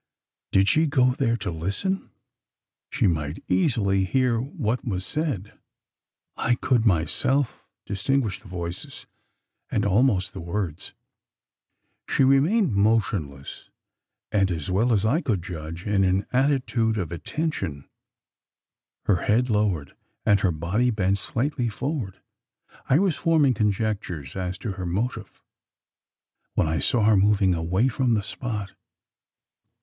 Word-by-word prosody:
Did 95 Hz, 0 st, +4 dB
she 155 Hz, +7 st, +4 dB
go 130 Hz, -3 st, +3 dB
there 125 Hz, -4 st, 0 dB
to 100 Hz, -, -4 dB
listen? 100 Hz, -, -2 dB, 0.8 s
She -, -, 0 dB
might 80 Hz, -2 st, -1 dB
easily 100 Hz, -1 st, +2 dB
hear 125 Hz, +3 st, +1 dB
what 125 Hz, -, -2 dB
was 95 Hz, -7 st, -3 dB
said: 145 Hz, -, -3 dB, 0.8 s
I 120 Hz, -, +1 dB
could 120 Hz, -2 st, +1 dB
myself 115 Hz, -, 0 dB, 0.2 s
distinguish 105 Hz, +2 st, -1 dB
the 110 Hz, -, -15 dB
voices, 85 Hz, -2 st, -6 dB, 0.6 s
and -, -, 0 dB
almost 100 Hz, -2 st, +2 dB
the -, -, -7 dB
words. 85 Hz, -2 st, -4 dB, 1.2 s
She -, -, +3 dB
remained 140 Hz, -, +3 dB
motionless; 100 Hz, -10 st, 0 dB, 0.6 s
and, 100 Hz, -3 st, +2 dB
as 85 Hz, -1 st, -3 dB
well 110 Hz, +7 st, +2 dB
as 105 Hz, -2 st, +2 dB
I 145 Hz, +10 st, +2 dB
could 100 Hz, -, -1 dB
judge, 85 Hz, -1 st, -7 dB
in 100 Hz, -2 st, +2 dB
an 95 Hz, +2 st, +1 dB
attitude 125 Hz, -4 st, +1 dB
of 90 Hz, -6 st, -3 dB
attention 95 Hz, -, -3 dB, 1.2 s
her 100 Hz, -, +3 dB
head 120 Hz, +3 st, +2 dB
lowered, 100 Hz, -9 st, 0 dB, 0.3 s
and 105 Hz, -2 st, +4 dB
her 95 Hz, -2 st, +2 dB
body 90 Hz, +10 st, 0 dB
bent 100 Hz, -3 st, +1 dB
slightly 125 Hz, +3 st, -1 dB
forward. 120 Hz, -, -4 dB, 0.7 s
I 130 Hz, -, +5 dB
was 185 Hz, -3 st, +2 dB
forming 160 Hz, -6 st, +3 dB
conjectures 100 Hz, -, -2 dB
as 90 Hz, -1 st, -3 dB
to 110 Hz, -, -1 dB
her 95 Hz, -1 st, -5 dB
motive, 110 Hz, +5 st, -3 dB, 1.1 s
when -, -, +3 dB
I 80 Hz, 0 st, 0 dB
saw 115 Hz, -, +2 dB
her 110 Hz, 0 st, +5 dB
moving 100 Hz, -1 st, +3 dB
away 90 Hz, +8 st, +1 dB
from 130 Hz, -2 st, +1 dB
the 105 Hz, -, 0 dB
spot. 105 Hz, -4 st, -4 dB
105 Hz, 130 wpm, -25 LUFS, 90-125 Hz, 1.2 s, I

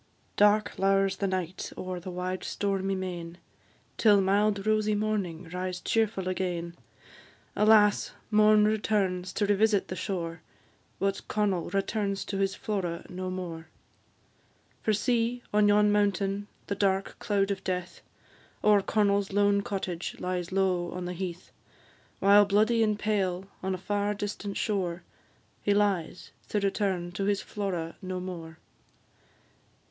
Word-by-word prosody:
Dark 210 Hz, +1 st, +3 dB
lowers 195 Hz, 0 st, +2 dB
the 200 Hz, -, 0 dB
night 185 Hz, -1 st, -3 dB
o'er 185 Hz, -1 st, -4 dB
the 180 Hz, +2 st, -8 dB
wide 180 Hz, +1 st, -3 dB
stormy 195 Hz, -1 st, -1 dB
main, 175 Hz, -2 st, -5 dB, 0.6 s
Till 210 Hz, -3 st, +5 dB
mild 200 Hz, +1 st, +2 dB
rosy 215 Hz, -1 st, +2 dB
morning 200 Hz, -6 st, -2 dB
rise 180 Hz, +1 st, -3 dB
cheerful 215 Hz, -4 st, 0 dB
again; 175 Hz, -2 st, -2 dB, 0.8 s
Alas! 210 Hz, -1 st, +5 dB, 0.2 s
morn 215 Hz, 0 st, +6 dB
returns 200 Hz, -4 st, 0 dB
to 205 Hz, -, +1 dB
revisit 205 Hz, 0 st, +2 dB
the 185 Hz, -, -3 dB
shore, 165 Hz, -4 st, -4 dB, 0.6 s
But 195 Hz, 0 st, -2 dB
Connel 200 Hz, -5 st, 0 dB
returns 195 Hz, +1 st, -1 dB
to 195 Hz, -, -3 dB
his 195 Hz, 0 st, +1 dB
Flora 180 Hz, -5 st, -3 dB
no 185 Hz, +1 st, -4 dB
more. 170 Hz, -3 st, -5 dB, 1.1 s
For 220 Hz, -, +1 dB
see, 235 Hz, +3 st, 0 dB
on 210 Hz, 0 st, +5 dB
yon 210 Hz, 0 st, +5 dB
mountain, 200 Hz, 0 st, +1 dB, 0.2 s
the -, -, -2 dB
dark 195 Hz, -1 st, 0 dB
cloud 200 Hz, -2 st, +1 dB
of 195 Hz, -1 st, -3 dB
death, 180 Hz, -1 st, -3 dB, 0.6 s
O'er 210 Hz, -1 st, +5 dB
Connel's 200 Hz, -1 st, +1 dB
lone 200 Hz, 0 st, +3 dB
cottage, 185 Hz, -4 st, -4 dB
lies 180 Hz, -1 st, -3 dB
low 185 Hz, -2 st, +1 dB
on 180 Hz, 0 st, -4 dB
the 180 Hz, -, -3 dB
heath; 180 Hz, 0 st, -6 dB, 0.7 s
While 205 Hz, +1 st, +6 dB
bloody 215 Hz, +3 st, +3 dB
and 215 Hz, -2 st, +2 dB
pale, 195 Hz, -3 st, -1 dB, 0.2 s
on 190 Hz, 0 st, -1 dB
a -, -, -5 dB
far 205 Hz, +2 st, -1 dB
distant 205 Hz, 0 st, -4 dB
shore, 180 Hz, -5 st, -1 dB, 0.6 s
He 205 Hz, -, +2 dB
lies, 195 Hz, -5 st, 0 dB, 0.2 s
to 210 Hz, -, +1 dB
return 195 Hz, -3 st, -1 dB
to 195 Hz, +2 st, -3 dB
his 200 Hz, 0 st, 0 dB
Flora 180 Hz, -5 st, -4 dB
no 185 Hz, -1 st, -4 dB
more. 170 Hz, -3 st, -7 dB
195 Hz, 135 wpm, -28 LUFS, 185-205 Hz, 1.1 s, morn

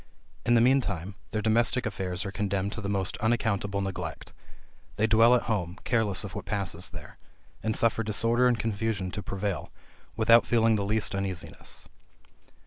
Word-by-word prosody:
In 120 Hz, -, +5 dB
the 115 Hz, -, +5 dB
mean 135 Hz, +3 st, +5 dB
time, 100 Hz, -3 st, -4 dB, 0.2 s
their 110 Hz, -1 st, -2 dB
domestic 115 Hz, +3 st, +2 dB
affairs 95 Hz, -3 st, -3 dB
are 100 Hz, -, -4 dB
condemned 100 Hz, -1 st, -1 dB
to 105 Hz, -, -5 dB
the 100 Hz, -, -3 dB
most 95 Hz, -2 st, -1 dB
unaccountable 105 Hz, -3 st, 0 dB
neglect. 90 Hz, -4 st, -5 dB, 0.6 s
They 105 Hz, -, +2 dB
dwell 115 Hz, +2 st, +6 dB
at 120 Hz, -, +1 dB
home, 95 Hz, -5 st, -2 dB
careless 110 Hz, -6 st, +1 dB
of 100 Hz, -, -7 dB
what -, -, -6 dB
passes 95 Hz, -4 st, -3 dB
there; 80 Hz, -4 st, -11 dB, 0.4 s
and 110 Hz, -1 st, -1 dB
suffer 115 Hz, -1 st, +2 dB
disorder 115 Hz, +3 st, +2 dB
and 120 Hz, -2 st, +2 dB
confusion 105 Hz, -4 st, -2 dB
to 105 Hz, -, -4 dB
prevail, 100 Hz, -1 st, -3 dB, 0.4 s
without 115 Hz, +1 st, +5 dB
feeling 115 Hz, -1 st, +3 dB
the 100 Hz, -2 st, -1 dB
least 105 Hz, 0 st, +1 dB
uneasiness. 95 Hz, -3 st, -3 dB
105 Hz, 165 wpm, -28 LUFS, 95-115 Hz, 0.6 s, dwell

